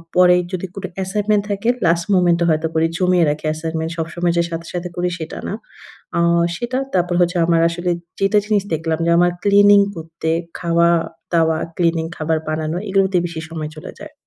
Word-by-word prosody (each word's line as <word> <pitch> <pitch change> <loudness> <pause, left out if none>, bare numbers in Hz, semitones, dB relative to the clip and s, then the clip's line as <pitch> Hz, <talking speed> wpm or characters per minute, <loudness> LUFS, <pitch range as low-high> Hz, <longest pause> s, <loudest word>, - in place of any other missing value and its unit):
পরে 180 0 +6 0.2
যদি 185 0 -3
কোন 195 - -7
অ্যাসাইনমেন্ট 205 +2 0
থাকে, 200 +3 -1 0.2
লাস্ট 170 0 +2
মোমেন্টে 175 -2 +3
হয়তো 155 +1 +1
করি, 160 0 +2
জমিয়ে 180 -1 +3
রাখি 150 +1 -3
অ্যাসাইনমেন্ট 160 +1 -3
সবসময় 170 +1 -1
যে 170 - +3
সাথে, 165 0 -5
সাথে 180 0 -4
করি 180 0 0
সেটা 160 -1 -6
না। - - -3 0.6
আ - - +2 0.4
সেটা 240 +6 -3 0.2
তারপর 180 -1 +1
হচ্ছে, 175 +1 +1
আমার 165 -1 +3
আসলে 175 +1 -2 0.3
যেটা 195 +2 +2
জিনিস 210 -2 +1
দেখলাম 160 0 -1
যে, - - +1
আমার 175 0 +4
ক্লিনিং 205 0 +6 0.2
করতে, 165 0 -5 0.3
খাওয়া-দাওয়া, 165 -1 +1 0.2
ক্লিনিং 165 -2 +1
খাবার 160 +1 0
বানানো, 155 +2 -2
এগুলোতে 195 -1 +2
বেশি 170 -2 -5
সময় 155 -2 -5
চলে 155 - -9
যায়। - - -10
170 Hz, 170 wpm, -19 LUFS, 165-185 Hz, 0.6 s, পরে